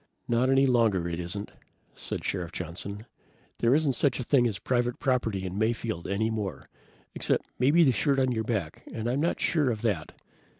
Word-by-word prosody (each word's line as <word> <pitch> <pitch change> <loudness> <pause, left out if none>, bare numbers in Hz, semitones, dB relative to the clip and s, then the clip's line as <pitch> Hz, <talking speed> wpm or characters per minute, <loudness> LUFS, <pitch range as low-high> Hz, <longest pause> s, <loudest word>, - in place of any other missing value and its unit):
"Not 120 +2 +2
any 135 +1 +5
longer 115 -9 +3
it 85 0 -3
isn't," 90 +4 -4 0.4
said - - -6
Sheriff 90 -3 -2
Johnson. 95 +5 -6 0.5
"There 120 +3 +4
isn't 150 -3 +2
such 130 +1 +1
a - - -2
thing 125 -1 +3
as 105 -4 -3
private 120 +1 0
property 115 -8 0
in 95 +2 -4
Mayfield, 110 -4 -1
any 110 +3 0
more. 105 -4 -4 0.5
Except - - 0
maybe 145 +7 +5
the 135 - +5
shirt 135 +5 +1
on 130 -1 +2
your 110 -2 -1
back, 100 -9 -3
and 115 0 -4
I'm 130 +4 0
not 170 - 0
sure 150 -6 +2
of 110 -2 -3
that. 100 -9 -2
115 Hz, 185 wpm, -28 LUFS, 100-130 Hz, 0.5 s, any